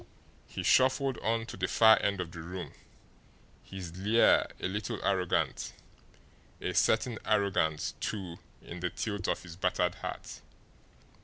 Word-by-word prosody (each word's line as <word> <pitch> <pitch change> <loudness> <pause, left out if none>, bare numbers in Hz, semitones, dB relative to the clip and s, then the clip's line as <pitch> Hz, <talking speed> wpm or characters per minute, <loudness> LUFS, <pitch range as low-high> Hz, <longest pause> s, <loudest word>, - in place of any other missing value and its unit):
He - - -5
shuffled 130 0 +3
on 115 +1 0
to - - -8
the 95 0 -1
far 110 +2 +6
end 100 -1 0
of 90 -2 -4
the 85 - -9
room, 90 -1 -7 0.9
his 90 -3 -8
leer 105 +5 +4
a - - -1
little 105 +3 -3
arrogant, 90 -3 0 0.9
a - - -3
certain - - +2
arrogance, 85 -6 +1
too, 95 -5 -4 0.2
in 90 - -8
the 90 +1 -1
tilt 100 -2 -3
of - - -1
his 85 -2 -10
battered 90 -1 +1
hat. 90 - -7
95 Hz, 140 wpm, -31 LUFS, 90-110 Hz, 0.9 s, far